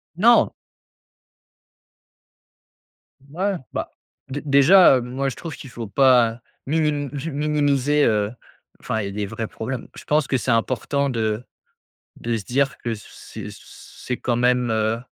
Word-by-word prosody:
Non. 230 Hz, +7 st, +5 dB, 2.8 s
Ouais 190 Hz, +5 st, -1 dB, 0.2 s
bah, -, -, -3 dB, 0.4 s
dé 140 Hz, +2 st, -4 dB
déjà, 145 Hz, +4 st, +7 dB
heu, -, -, -2 dB
moi 130 Hz, +3 st, -2 dB
je 130 Hz, -, -7 dB
trouve 165 Hz, -4 st, -7 dB
qu'il 135 Hz, -, -11 dB
faut 115 Hz, -2 st, -7 dB
pas 120 Hz, 0 st, +4 dB, 0.3 s
minim 150 Hz, -1 st, 0 dB, 0.2 s
minimiser, 145 Hz, -1 st, +1 dB
heu, 105 Hz, -2 st, +1 dB, 0.5 s
enfin 110 Hz, -, -2 dB
il -, -, -3 dB
y -, -, -3 dB
a -, -, -7 dB
des 105 Hz, +1 st, -3 dB
vrais 110 Hz, +3 st, -5 dB
problèmes. 120 Hz, +2 st, -5 dB
Je -, -, -10 dB
pense 150 Hz, -2 st, +1 dB
que 130 Hz, -, +1 dB
c'est 125 Hz, -, -1 dB
important 130 Hz, +4 st, 0 dB
de 110 Hz, -1 st, -1 dB, 0.8 s
de 115 Hz, -1 st, -1 dB
se 105 Hz, -, -6 dB
dire 135 Hz, +3 st, 0 dB
que 115 Hz, -1 st, -3 dB
c 105 Hz, -, -11 dB
c'est -, -, -9 dB
c -, -, -12 dB, 0.5 s
c'est 125 Hz, -, -1 dB
quand 120 Hz, -2 st, -1 dB
même, 125 Hz, 0 st, +2 dB
heu, 110 Hz, +1 st, 0 dB
130 Hz, 155 wpm, -22 LUFS, 115-145 Hz, 2.8 s, déjà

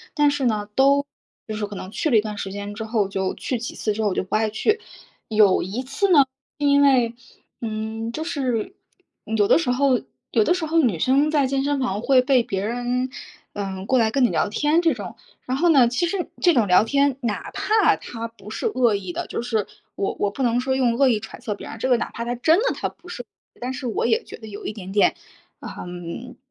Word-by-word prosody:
但 295 Hz, -1 st, +4 dB
是 285 Hz, -2 st, -1 dB
呢， 210 Hz, -3 st, 0 dB
都 280 Hz, +1 st, +4 dB, 0.4 s
就 215 Hz, -, -4 dB
是 210 Hz, -1 st, -3 dB
可 205 Hz, -, -8 dB
能 190 Hz, 0 st, -7 dB
去 310 Hz, -, -1 dB
了 235 Hz, -, +5 dB
一 210 Hz, -, +5 dB
段 210 Hz, -1 st, -6 dB
时 195 Hz, -, -4 dB
间 205 Hz, +1 st, -6 dB
之 210 Hz, -, -5 dB
后， 220 Hz, -2 st, 0 dB
就 190 Hz, -1 st, -2 dB
去 255 Hz, -, -3 dB
几 235 Hz, -, -6 dB
次 215 Hz, -, -1 dB
之 220 Hz, -, -3 dB
后 210 Hz, -, +2 dB
我 185 Hz, -, -3 dB
就 -, -, 0 dB
不 185 Hz, -, -3 dB
爱 215 Hz, 0 st, +2 dB
去。 425 Hz, -, +1 dB, 0.5 s
有 210 Hz, -3 st, +4 dB
一 205 Hz, +8 st, -3 dB
次 275 Hz, +10 st, 0 dB
呢 330 Hz, -, +7 dB, 0.4 s
是 290 Hz, -, 0 dB
因 285 Hz, 0 st, +5 dB
为， 255 Hz, -5 st, +4 dB, 0.5 s
嗯， 220 Hz, 0 st, -4 dB
就 310 Hz, +6 st, -4 dB
是 270 Hz, -, -2 dB, 0.6 s
有 205 Hz, -, +3 dB
的 -, -, +6 dB
时 320 Hz, -, -1 dB
候 260 Hz, 0 st, +2 dB, 0.3 s
有 -, -, +4 dB
的 350 Hz, -, +3 dB
时 350 Hz, -3 st, -2 dB
候 330 Hz, +2 st, +2 dB
女 235 Hz, -, +2 dB
生 275 Hz, -, +3 dB
在 290 Hz, -3 st, +3 dB
健 270 Hz, 0 st, 0 dB
身 285 Hz, 0 st, 0 dB
房 210 Hz, -6 st, -1 dB
会 260 Hz, +1 st, +4 dB
被 255 Hz, -2 st, +3 dB
别 195 Hz, -1 st, -3 dB
人， 245 Hz, +2 st, -1 dB, 0.4 s
呃， 195 Hz, -2 st, -4 dB
过 260 Hz, -, +2 dB
来 225 Hz, -2 st, +3 dB
跟 270 Hz, 0 st, +3 dB
你 -, -, +2 dB
聊 -, -, 0 dB
天 295 Hz, +9 st, +2 dB
这 325 Hz, -4 st, +3 dB
种， 205 Hz, -6 st, -7 dB, 0.3 s
然 255 Hz, +1 st, -1 dB
后 345 Hz, +4 st, +3 dB
呢， 270 Hz, -7 st, +6 dB
其 250 Hz, +9 st, 0 dB
实 355 Hz, +1 st, -2 dB
这 350 Hz, -, +5 dB
种 235 Hz, -7 st, +3 dB
聊 180 Hz, +2 st, +6 dB
天， 280 Hz, +3 st, +2 dB
哪 225 Hz, -4 st, -3 dB
怕 435 Hz, 0 st, +3 dB
他 230 Hz, -1 st, -6 dB
不 220 Hz, -3 st, -14 dB
是 220 Hz, -, -5 dB
恶 250 Hz, -, +2 dB
意 190 Hz, -3 st, -5 dB
的 -, -, -3 dB
就 -, -, -3 dB
是 225 Hz, -4 st, -1 dB, 0.3 s
我 195 Hz, -, -1 dB
我 205 Hz, -, +1 dB
不 265 Hz, -, -3 dB
能 240 Hz, 0 st, +2 dB
说 260 Hz, +1 st, 0 dB
用 245 Hz, -3 st, +2 dB
恶 275 Hz, -, +5 dB
意 235 Hz, -4 st, +3 dB
揣 220 Hz, -, -10 dB
测 225 Hz, -4 st, -4 dB
别 -, -, -10 dB
人， -, -, -7 dB
这 260 Hz, -, -1 dB
个 250 Hz, -, +4 dB
哪 235 Hz, -, -3 dB
怕 235 Hz, -, -5 dB
他 240 Hz, +1 st, -2 dB
真 320 Hz, -, +3 dB
的 -, -, 0 dB
他 -, -, -2 dB
不 340 Hz, +2 st, -19 dB
是， 305 Hz, -9 st, -6 dB, 0.4 s
但 250 Hz, +1 st, -2 dB
是 265 Hz, -1 st, -5 dB
我 225 Hz, -, -1 dB
也 230 Hz, -1 st, +2 dB
觉 -, -, -9 dB
得 220 Hz, -, -11 dB
有 205 Hz, -1 st, -9 dB
一 -, -, -3 dB
点 190 Hz, -3 st, -8 dB
点， 205 Hz, 0 st, +3 dB, 0.5 s
嗯， 175 Hz, +7 st, -7 dB
240 Hz, 265 characters per minute, -23 LUFS, 210-275 Hz, 0.6 s, 呢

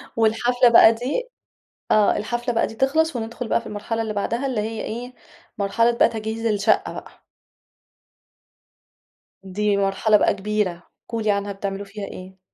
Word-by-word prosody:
والحفلة 240 Hz, +3 st, +3 dB
بقى 230 Hz, -1 st, +7 dB
دي 275 Hz, -, -3 dB, 0.6 s
آه، 210 Hz, -1 st, +4 dB
الحفلة 240 Hz, +3 st, -2 dB
بقى 230 Hz, -, +1 dB
دي 225 Hz, -, -10 dB
تخلَص، 305 Hz, +5 st, +1 dB
وندخل 230 Hz, +1 st, -5 dB
بقى 230 Hz, -, +1 dB
في -, -, -11 dB
المرحلة 220 Hz, +2 st, -3 dB
اللي 220 Hz, -1 st, -3 dB
بعدها 235 Hz, +6 st, -2 dB
اللي 250 Hz, -5 st, -1 dB
هي 220 Hz, +1 st, -4 dB
إيه، 245 Hz, +3 st, -6 dB, 0.4 s
مرحلة 215 Hz, +3 st, +2 dB
بقى 235 Hz, -, +3 dB
تجهيز 220 Hz, +1 st, -5 dB
الشقة 210 Hz, -2 st, +1 dB
بقى. -, -, -11 dB, 2.2 s
دي 200 Hz, +2 st, 0 dB
مرحلة 200 Hz, +2 st, +3 dB
بقى -, -, +2 dB
كبيرة، 200 Hz, -4 st, -2 dB, 0.3 s
قولي 230 Hz, -1 st, -3 dB
لي 210 Hz, -, +4 dB
عنها 200 Hz, 0 st, -2 dB
بتعملوا 195 Hz, 0 st, -5 dB
فيها 200 Hz, 0 st, -7 dB
إيه؟ 185 Hz, 0 st, -10 dB
220 Hz, 155 wpm, -22 LUFS, 205-235 Hz, 2.2 s, بقى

